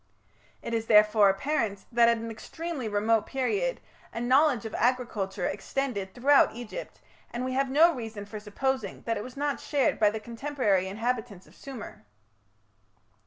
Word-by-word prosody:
It 230 - -4
is 225 0 -1
therefore 210 -1 +6
apparent 205 -2 -1
that 235 0 +5
at 235 - +3
an 230 0 -5
extremely 300 +3 -5
remote 215 +1 +1
period 405 - -1 0.3
a - - -5
knowledge 255 0 +3
of 220 - -6
agriculture 225 -7 -1
extended 205 -1 -3
throughout 275 -1 +4
Egypt, 240 -2 -8 0.3
and 240 +1 -3
we 255 - -2
have 270 +1 +1
no 325 +5 +5
reason 225 -5 -6
for 215 +1 -7
supposing 260 +6 -3
that 230 - -1
it - - -4
was 255 +1 -10
not 285 0 -1
shared 285 -3 0
by 210 -1 +5
the 220 +1 -4
contemporary 230 -5 -1
inhabitants 225 -1 -3
of - - -20
Sumer. 260 - -9
235 Hz, 160 wpm, -28 LUFS, 210-270 Hz, 0.3 s, therefore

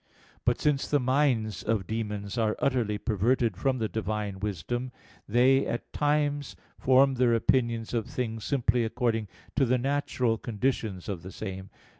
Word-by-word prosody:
But - - +2
since 145 -2 +1
the 145 - +2
minds 125 - +1
of 105 -3 0
demons 105 -1 -3
are 110 -3 +1
utterly 120 -6 +1
perverted 110 +2 +1
from 130 +7 0
the 110 -2 -1
Divine 105 -3 -3
wisdom, 105 +6 -3 0.4
they 130 +5 +4
at 120 - -4
times 145 -1 0 0.2
form 135 +1 +5
their 125 -2 +3
opinions 115 -1 +1
of 115 -3 -1
things 115 -3 -3
simply 125 -3 +1
according 115 -1 0 0.3
to 140 - +3
the 130 0 +3
natural 130 -3 0
conditions 110 -5 -2
of 95 -5 -4
the 95 +2 -9
same. 95 -1 -6
115 Hz, 150 wpm, -28 LUFS, 105-130 Hz, 0.4 s, form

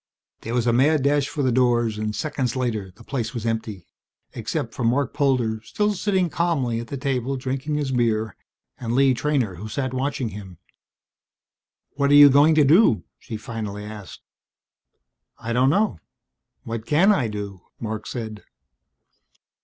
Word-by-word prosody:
There 115 +2 -4
was 120 -2 +1
a 120 - +3
mad 140 +3 +3
rush 145 -1 +2
for 150 -3 -3
the 130 - +2
doors 120 -3 +2
and 105 0 -2
seconds 135 +1 -2
later 115 -6 -2
the 105 +6 -17
place 120 -2 -4
was 115 -1 -4
empty 110 -5 -3 0.5
except - - -4
for - - -4
Marc 125 +3 +1
Polder, 130 -7 +1
still 210 - -1
sitting 190 -2 +1
calmly 150 -9 0
at 120 - -7
the 140 - -5
table 135 -1 -1
drinking 135 +3 -3
his 145 -2 -1
beer, 110 -4 0 0.4
and 120 -1 -2
Lee 135 0 +4
Treynor 125 - -1
who 110 +5 -7
sat 130 +2 -3
watching 130 -2 -2
him. 95 -4 -10 1.4
"What 140 -1 +2
are 145 - +6
you 145 -1 +9
going 145 +4 +5
to 155 - +5
do?" 145 - +5 0.2
she 110 - -7
finally 105 -3 -6
asked. 105 -3 -10 1.2
"I 115 +1 -4
don't 125 +2 +3
know. 200 - +1 0.6
What 115 -1 -5
can 175 +8 +4
I 135 - +1
do?" 100 -3 -6 0.2
Marc 110 -1 -5
said. 110 -3 -6
125 Hz, 160 wpm, -23 LUFS, 110-140 Hz, 1.4 s, you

